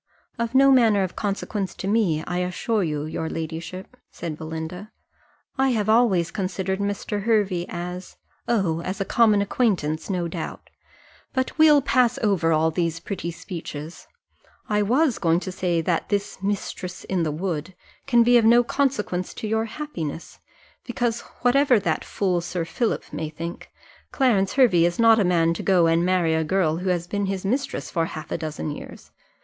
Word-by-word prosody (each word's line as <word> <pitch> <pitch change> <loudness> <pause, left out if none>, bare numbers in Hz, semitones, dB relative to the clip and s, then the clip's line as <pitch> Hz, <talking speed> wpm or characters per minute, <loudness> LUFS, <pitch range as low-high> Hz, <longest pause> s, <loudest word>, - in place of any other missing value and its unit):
"Of 235 +2 -2
no 275 +1 +7
manner 225 -6 +4
of 185 - -4
consequence 200 -1 -3
to 190 - -5
me, 195 -8 +1
I 180 0 -2
assure 180 +5 -1
your 155 0 -3
ladyship," 165 +6 -6
said 165 -3 -6
Belinda; 160 +6 -6 0.7
"I 270 0 +4
have 215 -2 0
always 205 -8 +3
considered 190 -1 -2
Mr. 205 0 -2
Hervey 200 -6 +1
as 180 +1 -6
" - - -40
"Oh, 165 -5 0
as 185 +3 -4
a 195 - -1
common 215 -3 +4
acquaintance, 180 -9 0
no 180 -3 -1
doubt 165 - -7 0.6
but 260 -1 -1
we'll 300 -3 +6
pass 250 -2 +2
over 190 -6 +2
all 160 +1 +3
those 165 0 -1
pretty 170 -1 -5
speeches: 165 -2 -8 0.6
I 210 -1 +1
was 255 +5 +2
going 165 -1 +2
to 185 - -5
say 180 -3 0
that 165 0 -1
this 200 -1 -2
'mistress 195 -2 -4
in 185 -2 -1
the 160 - 0
wood' 170 +2 -4 0.3
can 240 -3 +5
be 240 +1 +6
of 225 - +1
no 240 +2 +6
consequence 220 -9 -1
to 220 - -5
your 220 +1 0
happiness, 215 - -6 0.4
because, 240 -2 -1 0.2
whatever 255 -1 +4
that 200 - -1
fool 185 -3 -1
Sir 175 0 -3
Philip 220 +8 -2
may 155 -1 -3
think, 165 +2 -7 0.4
Clarence 210 -8 +2
Hervey 235 -11 +5
is 175 0 +1
not 230 -1 +6
a - - +4
man 170 -2 +2
to - - -5
go 180 -3 +3
and 165 +1 +3
marry 180 -3 +2
a 160 0 +1
girl 165 -2 +1
who 185 +2 -2
has 175 -2 0
been 200 +2 -2
his 195 -1 -3
mistress 260 +7 -2
for 165 -2 0
half 155 - -8
a - - 0
dozen 155 -1 -4
years. - - -10
190 Hz, 175 wpm, -24 LUFS, 170-225 Hz, 0.7 s, no